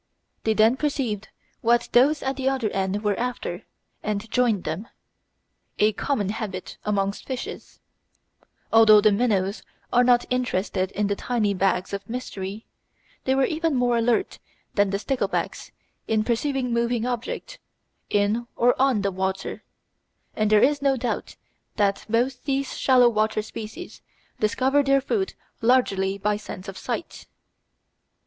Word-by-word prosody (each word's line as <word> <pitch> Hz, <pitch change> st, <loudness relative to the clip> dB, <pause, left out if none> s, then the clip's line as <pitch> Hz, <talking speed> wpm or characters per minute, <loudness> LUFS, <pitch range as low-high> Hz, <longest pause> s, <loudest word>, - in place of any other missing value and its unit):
They 220 Hz, -1 st, +2 dB
then 220 Hz, +4 st, +4 dB
perceived 255 Hz, -8 st, -2 dB, 0.3 s
what 235 Hz, +1 st, +3 dB
those 280 Hz, +5 st, +4 dB
at 265 Hz, 0 st, -1 dB
the 265 Hz, 0 st, 0 dB
other 255 Hz, -6 st, -1 dB
end 195 Hz, +2 st, -1 dB
were 210 Hz, -1 st, +2 dB
after 245 Hz, 0 st, -3 dB, 0.4 s
and 210 Hz, +1 st, -3 dB
joined 235 Hz, -7 st, +2 dB
them 170 Hz, +9 st, -4 dB, 0.9 s
a 215 Hz, +1 st, +3 dB
common 210 Hz, -4 st, -1 dB
habit 205 Hz, -4 st, -5 dB
amongst 200 Hz, -1 st, -1 dB
fishes. 260 Hz, -2 st, -6 dB, 0.9 s
Although 220 Hz, -2 st, +8 dB
the 215 Hz, 0 st, +4 dB
minnows 200 Hz, -2 st, +1 dB, 0.3 s
were 245 Hz, 0 st, +5 dB
not 245 Hz, -1 st, +4 dB
interested 200 Hz, -6 st, 0 dB
in 210 Hz, -, 0 dB
the 200 Hz, 0 st, 0 dB
tiny 215 Hz, -3 st, 0 dB
"bags 190 Hz, 0 st, 0 dB
of 200 Hz, 0 st, -5 dB
mystery," 215 Hz, -4 st, -5 dB, 0.6 s
they 265 Hz, -, +2 dB
were 270 Hz, 0 st, +3 dB
even 320 Hz, 0 st, 0 dB
more 245 Hz, -1 st, +2 dB
alert 235 Hz, +10 st, +1 dB, 0.3 s
than 205 Hz, -1 st, +3 dB
the 195 Hz, -, 0 dB
sticklebacks 260 Hz, +5 st, -2 dB, 0.4 s
in 220 Hz, -1 st, +2 dB
perceiving 250 Hz, +2 st, -1 dB
moving 235 Hz, 0 st, 0 dB
objects 250 Hz, -, -4 dB, 0.5 s
in 210 Hz, +3 st, +1 dB
or 245 Hz, +1 st, +4 dB
on 260 Hz, -7 st, +3 dB
the 200 Hz, -, +1 dB
water, 190 Hz, +1 st, -3 dB, 0.7 s
and 215 Hz, -1 st, +1 dB
there 210 Hz, -1 st, +5 dB
is 285 Hz, +2 st, +3 dB
no 275 Hz, -1 st, +2 dB
doubt 245 Hz, 0 st, -3 dB, 0.4 s
that 200 Hz, -2 st, 0 dB
both 245 Hz, +3 st, 0 dB
these 275 Hz, -1 st, -1 dB
shallow 255 Hz, -2 st, +5 dB
water 215 Hz, -1 st, +1 dB
species 225 Hz, +11 st, -8 dB, 0.4 s
discover 260 Hz, +6 st, +2 dB
their 275 Hz, 0 st, +3 dB
food 385 Hz, -, -2 dB, 0.3 s
largely 200 Hz, -6 st, +2 dB
by 210 Hz, +1 st, 0 dB
sense 210 Hz, -2 st, -9 dB
of 195 Hz, -, -6 dB
sight. -, -, -5 dB
225 Hz, 140 wpm, -24 LUFS, 205-255 Hz, 0.9 s, Although